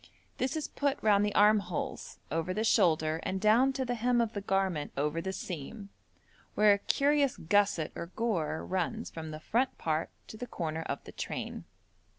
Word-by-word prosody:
This 260 +4 0
is 310 - -3
put 285 -1 -1
round 205 -2 +5
the 210 - -1
armholes, 205 -5 +2
over 165 +4 -1
the 215 - 0
shoulder, 160 -7 +3
and 190 - -2
down 225 +6 +4
to 260 0 -2
the 245 - -1
hem 245 +1 +1
of 230 -1 0
the 205 - -3
garment 190 -6 0
over 150 +3 0
the 190 - -3
seam, 190 +4 -6 0.7
where 210 -1 +6
a 200 - 0
curious 280 +3 +2
gusset 185 -2 +2
or 170 - -6
gore 180 -6 -2
runs 190 +5 -2
from 160 -1 -7
the 155 0 -6
front 245 +10 0
part 160 0 -1 0.2
to 220 - -10
the 245 - -6
corner 160 -5 -3
of 140 - -4
the - - -10
train. - - -5
200 Hz, 180 wpm, -31 LUFS, 165-230 Hz, 0.7 s, where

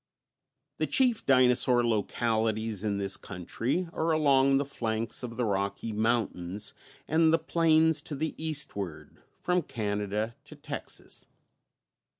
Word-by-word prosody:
_ - - -61 0.8
The - - +1
chief 250 -4 +2
dinosaur 125 -1 +4
localities 110 -1 0
in 105 -2 0
this 100 -1 -1
country 115 - -3
are 160 - 0
along 140 -3 +4
the 140 - 0
flanks 115 -4 -3
of 115 -2 -6
the 125 - +1
Rocky 100 +2 -2
Mountains 105 -3 -1 0.3
and 160 +1 +4
the 165 - +5
plains 160 -1 +3
to 150 - -3
the 155 +3 -2
eastward, 140 - -4 0.2
from 180 0 +1
Canada 105 -3 -2
to - - -12
Texas. - - -6
120 Hz, 130 wpm, -29 LUFS, 105-155 Hz, 0.8 s, the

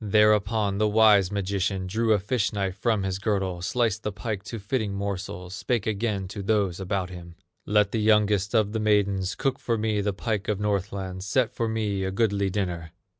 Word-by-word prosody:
Thereupon 105 -1 +3
the 110 - +3
wise 105 -3 +5
magician 100 -1 -1
Drew 110 +4 0
a 105 - +5
fish 105 +3 0
knife 100 -3 -2
from 110 -1 0
his 95 -1 -2
girdle, 95 -4 -1
Sliced 110 +2 0
the 105 - -3
pike 105 0 -4
to 115 - -5
fitting 105 -1 -2
morsels, 100 -2 -4
Spake 115 +1 -1
again 105 -2 -1
to 100 +1 -6
those 100 -3 0
about 95 -1 -2
him: 85 -1 -10 0.3
"Let 105 -1 +3
the 110 - 0
youngest 105 -1 +3
of 105 -2 +3
the 110 - -1
maidens 100 -3 +1
Cook 135 -1 -1
for 115 -1 -1
me 105 -1 0
the 100 0 0
pike 100 0 -3
of 105 -2 0
Northland, 100 -2 -2
Set 115 +4 +1
for 115 -1 -1
me 105 -3 -1
a 95 - -1
goodly 100 -1 +1
dinner!" 90 -4 -3
100 Hz, 190 wpm, -26 LUFS, 95-110 Hz, 0.3 s, wise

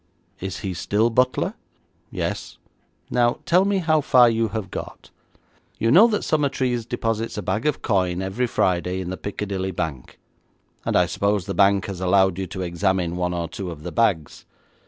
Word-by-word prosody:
'Is 95 0 -5
he 95 -2 -3
still 105 +6 +1
butler?' 125 +2 +1 0.6
'Yes.' - - -4 0.5
'Now 120 -1 +2
tell 180 +3 +4
me 200 0 +1
how 160 -4 +2
far 125 -3 +5
you 115 0 +1
have 105 -3 -5
got. - - -8 0.7
You 115 - +1
know 195 - +8
that 210 -3 -1
Summertrees 130 -6 0
deposits 115 -2 -2
a 105 - -3
bag 110 +9 -1
of 150 - -1
coin 90 -4 +1
every 95 +7 -1
Friday 90 -3 0
in 90 -1 -4
the - - -3
Piccadilly 100 -2 -4
bank, 80 -8 -5 0.7
and - - 0
I - - +5
suppose 100 -2 0
the 100 - -3
bank 100 0 +3
has 95 -2 -6
allowed 95 0 +3
you 95 - -3
to 95 +1 -5
examine 90 0 0
one 90 0 -1
or 85 -1 -2
two 90 +3 -6
of 80 -3 -9
the 90 - -5
bags.' 95 -10 0
100 Hz, 180 wpm, -23 LUFS, 90-120 Hz, 0.7 s, know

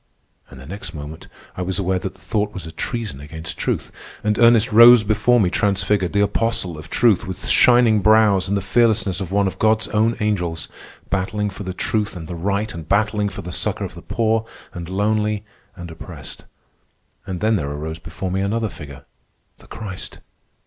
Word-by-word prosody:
And 65 - -12
the 65 - -11
next 90 +1 -7
moment 75 +1 -8 0.3
I - - -4
was 90 +1 -1
aware 95 -1 0
that 95 - -6
the - - -22
thought 105 +2 -2
was 95 - -6
a 80 - -8
treason 110 - -4
against 80 +3 -7
truth, - - -2 0.3
and 105 +1 0
Ernest 115 -2 +5
rose 115 +1 +9
before 110 +4 +3
me 90 -5 +2
transfigured, 100 -2 +1
the 100 - +3
apostle 105 -3 0
of 75 +1 -10
truth, 110 -4 +2
with 95 - -6
shining 120 -3 +5
brows 105 -2 +4
and 100 +1 0
the - - -2
fearlessness 110 -3 +2
of 95 -2 -5
one 100 0 +2
of 95 - -3
God's 110 0 +2
own 110 +2 +2
angels, 90 -6 -1 0.4
battling 100 +2 -1
for 95 - -9
the 95 -2 -4
truth 105 +3 -2
and 80 -3 -7
the 90 - -6
right, 100 +5 -2
and 80 -2 -9
battling 105 0 +1
for 100 - -8
the 90 - -6
succor - - -1
of - - -8
the - - -11
poor 110 -1 0 0.3
and 85 -1 -7
lonely 105 +1 0 0.3
and 85 -1 -8
oppressed. 80 - -10 0.8
And 90 -2 -4
then 110 +3 +2
there 70 -8 -2
arose 80 +3 -5
before 85 +3 -6
me 95 +1 -1
another 110 +3 -1
figure, 70 -6 -11 0.5
the - - -18
Christ! 100 -5 -7
100 Hz, 190 wpm, -21 LUFS, 90-110 Hz, 0.8 s, rose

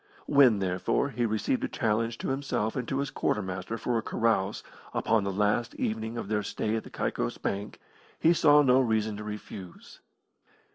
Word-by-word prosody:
When, 135 -6 +5
therefore, 95 +7 0
he 120 -2 0
received 110 +4 0
a - - +1
challenge 115 +1 0
to - - -4
himself 135 -5 -1
and 125 -2 -3
to 135 - -1
his 140 -1 -2
quartermaster 95 +1 -2
for 120 0 0
a - - -3
carouse 110 -3 0 0.3
upon 110 -2 +2
the 100 - -1
last 105 +5 0
evening 110 +1 -2
of 115 - -4
their 105 0 0
stay 110 +1 -2
at 110 - -2
the - - -11
Caicos - - -2
Bank 100 +1 -4 0.4
he 165 - +5
saw 150 -3 +6
no 130 -1 +5
reason 110 -3 0
to 105 - -6
refuse. 105 -3 -9
110 Hz, 180 wpm, -28 LUFS, 105-125 Hz, 0.4 s, saw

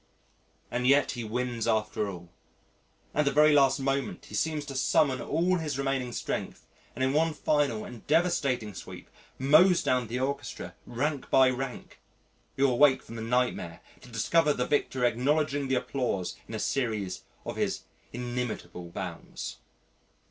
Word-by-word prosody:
And 125 +1 0
yet 140 +1 +4
he 120 -2 -5
wins 120 +1 -2
after 105 -2 0
all. 85 -3 -9 0.8
At 150 - +2
the 140 - +3
very 150 +2 +6
last 140 0 +4
moment 135 +1 -2
he - - -14
seems 155 -2 -1
to 140 -2 -7
summon 130 0 +2
all 175 +4 +1
his 150 -5 -3
remaining 135 -2 -1
strength - - -4 0.3
and 130 - -1
in 130 +1 +2
one 160 +1 +2
final 145 -8 +1
and 120 -3 -11
devastating 140 - +1
sweep - - -10 0.3
mows 155 +7 +5
down 125 -2 +1
the 120 +3 -3
orchestra 140 +2 -3
rank 140 +3 -2
by 130 -1 +6
rank.... 130 0 -6 0.6
You 140 +1 +4
awake 130 +2 +5
from 115 - -10
the 115 - -5
nightmare 115 -8 -1 0.2
to - - -14
discover 150 +7 +2
the 125 - -1
victor 130 -3 +1
acknowledging 140 +4 +1
the 130 - +1
applause 125 -8 -2
in 110 - -6
a - - -3
series 110 -8 -1 0.2
of - - -5
his - - -1 0.3
inimitable 120 -7 -4
bows. - - -6
130 Hz, 155 wpm, -29 LUFS, 120-145 Hz, 0.8 s, very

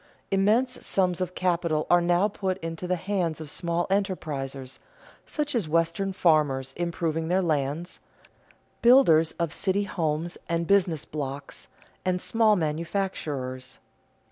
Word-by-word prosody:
Immense 220 +7 +2
sums 185 -2 +1
of 185 0 -3
capital 170 -4 0
are 175 0 +5
now 175 +3 +3
put 190 -2 -2
into 165 +2 -4
the 180 - +1
hands 180 -3 -2
of 155 -2 -7
small 170 0 -1
enterprisers, 140 -10 -2 0.5
such 295 -1 -2
as 215 -11 -1
Western 165 +4 +1
farmers 150 -7 +2
improving 165 -1 -2
their 185 +2 +2
lands, 155 +2 -1 0.8
builders 200 -11 +6
of 170 -3 -2
city 195 +1 +1
homes 165 -3 -2
and 170 0 0
business 175 -5 +2
blocks, 140 -2 -6 0.4
and 185 -1 0
small 220 +1 +3
manufacturers. 155 -6 -3
170 Hz, 125 wpm, -26 LUFS, 155-190 Hz, 0.8 s, builders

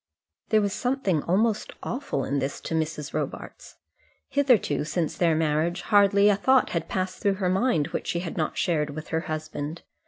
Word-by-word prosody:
There 215 -1 +4
was 200 -1 -1
something 245 - 0
almost 210 +6 0
awful 235 - -3
in 140 +1 -1
this 135 +1 -3
to - - -5
Mrs. 155 -2 -2
Robarts. - - -5 0.5
Hitherto, 250 - +2
since 160 +1 -2
their 170 -3 +2
marriage, 160 +2 0
hardly 200 -1 +5
a 205 - +5
thought 260 +6 +3
had 165 -1 -2
passed 185 0 -2
through 200 -1 +2
her 190 -2 -1
mind 185 - +1
which - - -4
she 170 - -1
had 170 -2 -5
not 155 - -2
shared 155 -5 +1
with 155 0 -7
her 160 - 0
husband. 155 0 -5
175 Hz, 180 wpm, -26 LUFS, 155-205 Hz, 0.5 s, hardly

